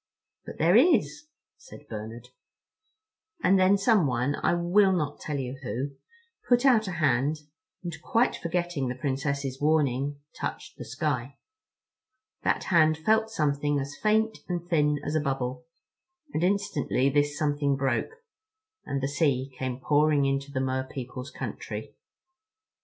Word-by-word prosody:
"But - - -8
there 170 +4 +4
is," 300 +2 +3 0.3
said - - -14
Bernard. 115 +2 -8 1.1
And 190 +1 +5
then 190 +2 +5
someone—I 150 - +2
will 190 +3 +3
not 150 -5 -2
tell 150 -2 -4
you 130 0 -5
who—put 245 - -3
out 230 -6 +5
a 185 - -3
hand, 150 -1 +1 0.4
and, 170 -2 -4
quite 240 -1 +2
forgetting 175 -5 -2
the 125 - -3
Princess's 140 0 -2
warning, 145 -2 +1 0.2
touched - - -5
the - - -6
sky. 135 0 -3 1.0
That - - 0
hand 155 -4 +4
felt 220 +7 +2
something 145 -6 0
as 140 +1 -5
faint 220 +1 +1
and 175 -1 -3
thin 150 -4 +2
as 150 - -2
a 155 - +2
bubble—and 165 - -6
instantly 180 -9 +1
this 145 +1 +1
something 145 -2 +1
broke, 135 - -2 0.6
and 140 -1 -3
the - - +2
sea 140 -2 0
came 130 -1 -4
pouring 145 +1 +3
into 135 +1 -1
the 130 - -1
Mer 130 0 -1
people's 130 0 -7
country. - - -6
145 Hz, 130 wpm, -27 LUFS, 135-180 Hz, 1.1 s, And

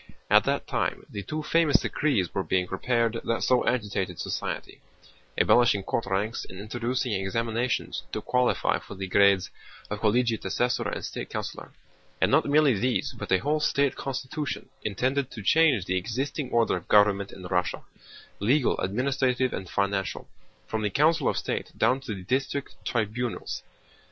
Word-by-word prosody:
At - - +6
that - - 0
time - - -2
the 100 - -4
two 155 +8 -4
famous 165 -2 +4
decrees 125 - 0
were 95 - 0
being 95 -1 +1
prepared 115 +4 0
that 115 - -1
so 125 -1 +3
agitated 100 -7 -1
society—abolishing 120 -5 -1
court 105 - -2
ranks 100 +4 -1
and 95 - -10
introducing 120 +4 -2
examinations 115 +5 -1
to - - -2
qualify 125 0 +1
for - - -10
the 95 0 -4
grades 100 0 +4 0.4
of 105 - -2
Collegiate 115 +1 +1
Assessor 120 +6 0
and - - -4
State - - -6
Councilor—and - - -5
not - - +4
merely 145 -2 +5
these 125 +5 0
but 120 - -7
a 95 - +6
whole 150 +10 0
state 140 -2 +1
constitution, 135 +2 -4
intended 130 +6 0
to 110 - -8
change 145 - +4
the 95 0 0
existing 130 - -3
order 115 -4 +2
of 90 -1 -6
government 105 -1 +4
in 95 - -11
Russia: 90 -1 -1 0.6
legal, 125 +7 +2
administrative, 130 +4 0
and 95 - -5
financial, 100 -1 -1 0.4
from 110 - -3
the 105 - 0
Council 155 - +3
of - - -1
State - - -3
down 125 +4 +3
to 110 -6 -5
the 95 - -9
district 135 +6 -2
tribunals. 120 +1 -2
115 Hz, 155 wpm, -27 LUFS, 100-130 Hz, 0.6 s, At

